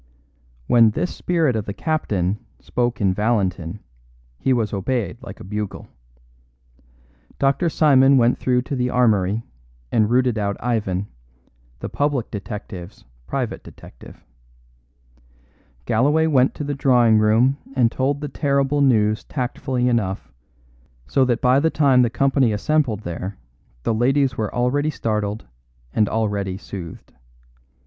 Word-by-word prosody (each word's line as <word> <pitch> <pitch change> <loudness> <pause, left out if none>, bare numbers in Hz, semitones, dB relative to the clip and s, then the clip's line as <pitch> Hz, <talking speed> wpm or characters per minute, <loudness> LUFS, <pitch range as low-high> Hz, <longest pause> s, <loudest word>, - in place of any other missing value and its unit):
When 115 - +5
this 175 +11 -3
spirit 165 -8 +1
of 110 -2 -2
the 100 - -5
captain 105 - -1 0.2
spoke 120 -2 -2
in 95 -2 +2
Valentin 95 -4 -1 0.6
he 135 - 0
was 115 -5 0
obeyed 105 +1 -2
like 125 - -10
a - - -9
bugle. 105 +1 -5 1.5
Dr. 140 +5 +1
Simon 135 -3 +5
went 120 0 +3
through 125 -1 +1
to 140 - -4
the 125 -1 0
armoury 110 -4 +2 0.5
and 110 -1 +2
routed 125 -2 +2
out 100 -1 -2
Ivan, 105 -6 -1 0.8
the - - -3
public 145 -5 -1
detective's 100 - -8 0.2
private - - -3
detective. - - -14 1.6
Galloway 145 +8 +2
went 135 -5 +3
to - - -5
the 145 0 -2
drawing 125 -5 +4
room 115 +6 +3 0.2
and 120 -3 +3
told 140 +2 -1
the 150 - -3
terrible 140 0 0
news 110 -5 +2
tactfully 125 -1 -2
enough, 105 -6 -1 0.7
so 130 - +2
that 120 -2 0
by 130 +2 +4
the 160 +3 +2
time 140 -5 +4
the 120 - +3
company 135 -1 +2
assembled 115 0 0
there 90 +2 -6 0.5
the 115 - 0
ladies 130 +3 +2
were 110 -3 -2
already 125 +5 0
startled 105 -5 -2 0.5
and 105 -2 +2
already 100 -4 -1
soothed. 95 -4 -9
120 Hz, 130 wpm, -21 LUFS, 105-135 Hz, 1.6 s, When